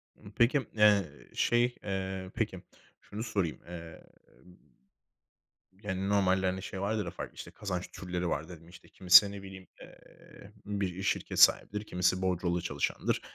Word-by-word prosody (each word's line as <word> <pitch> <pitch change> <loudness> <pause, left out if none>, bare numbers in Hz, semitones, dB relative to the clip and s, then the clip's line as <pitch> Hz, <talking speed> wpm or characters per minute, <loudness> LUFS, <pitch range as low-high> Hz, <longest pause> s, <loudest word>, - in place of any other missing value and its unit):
Imm, 100 - -14
peki, 125 +3 +2
eee, 105 -3 +5 0.3
şey, 120 +1 +2
eee, 95 -1 -4
peki, 105 -6 -2 0.4
şunu 105 +2 -7
sorayım. 100 -8 -2
Eee, 85 -2 -9 1.8
yani, 95 -1 -3
normalde, 95 -2 +2
hani, 95 +1 -2
şey 95 -1 -6
vardır 105 +1 -1
ya 85 - -5
farklı, - - -8
işte, - - -9
kazanç 90 -3 -5
türleri 90 -1 -4
var 80 0 -2
dedin. 85 -2 -12
İşte, 85 0 -15
kimisi, 95 +2 +6
ne 100 -1 -8
bileyim, 95 -1 -11
eee, 100 - -16
bir 95 -3 -3
şirket 100 - -2
sahibidir, 105 +1 +5
kimisi 90 -1 0
bordrolu 90 -1 0
çalışandır. - - -1
95 Hz, 145 wpm, -30 LUFS, 90-105 Hz, 1.8 s, kimisi